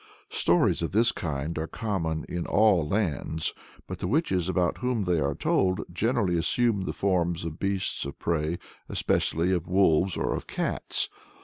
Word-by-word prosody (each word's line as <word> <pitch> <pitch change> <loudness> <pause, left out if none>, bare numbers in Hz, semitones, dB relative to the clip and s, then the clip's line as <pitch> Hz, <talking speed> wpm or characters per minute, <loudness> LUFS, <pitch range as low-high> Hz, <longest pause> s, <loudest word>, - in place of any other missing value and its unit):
Stories 85 +1 +3
of 85 - -2
this 115 +2 +4
kind 80 0 -3
are 80 - -2
common 80 -8 -2
in 90 -1 -4
all 100 -8 +4
lands, 80 -4 -1 0.3
but - - -7
the - - -2
witches 95 - +1
about 90 -2 +1
whom 125 -4 0
they 90 -3 +1
are 70 -1 0
told 95 -1 +1
generally 105 -1 +1
assume 105 +2 +2
the - - -2
forms 85 -3 0
of 80 -1 -6
beasts 100 -1 -1
of 70 - -6
prey, 80 0 -1 0.3
especially 85 +4 +1
of 90 -1 -1
wolves, 90 -1 +3
or - - 0
of - - -5
cats. - - -1
90 Hz, 165 wpm, -27 LUFS, 80-100 Hz, 0.3 s, this